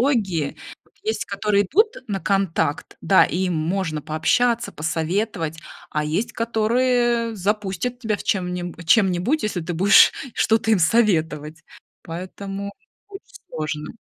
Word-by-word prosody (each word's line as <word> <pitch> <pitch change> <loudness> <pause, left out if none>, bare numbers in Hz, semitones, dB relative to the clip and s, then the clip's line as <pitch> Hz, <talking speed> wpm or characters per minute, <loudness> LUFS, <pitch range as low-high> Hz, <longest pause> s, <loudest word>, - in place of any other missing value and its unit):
технологии. 190 - 0 0.3
Вот - - -31
есть, 435 +2 -2
которые 200 0 +1
идут 425 - +2
на 200 -3 -3
контакт, 175 -7 -1
да, 195 - +5
им 180 0 -1
можно 160 -1 -2
пообщаться, 230 +11 +1
посоветовать, 160 +2 -2 0.3
а 150 0 -1
есть, 165 +10 -2
которые 235 +1 +1
запустят 210 +4 -2
тебя 220 -4 -1
в - - -7
чем-нибу 180 -3 -2
чем-нибудь, 190 - +2
если 195 -5 -2
ты 175 - -4
будешь 195 +4 +6 0.2
что-то 225 0 +2
им 215 - +4
советовать. 160 -6 +1 0.4
Поэтому 195 +4 -6 0.4
очень 390 -1 -12 0.2
сложно. 155 +3 -5
195 Hz, 125 wpm, -22 LUFS, 165-225 Hz, 0.4 s, будешь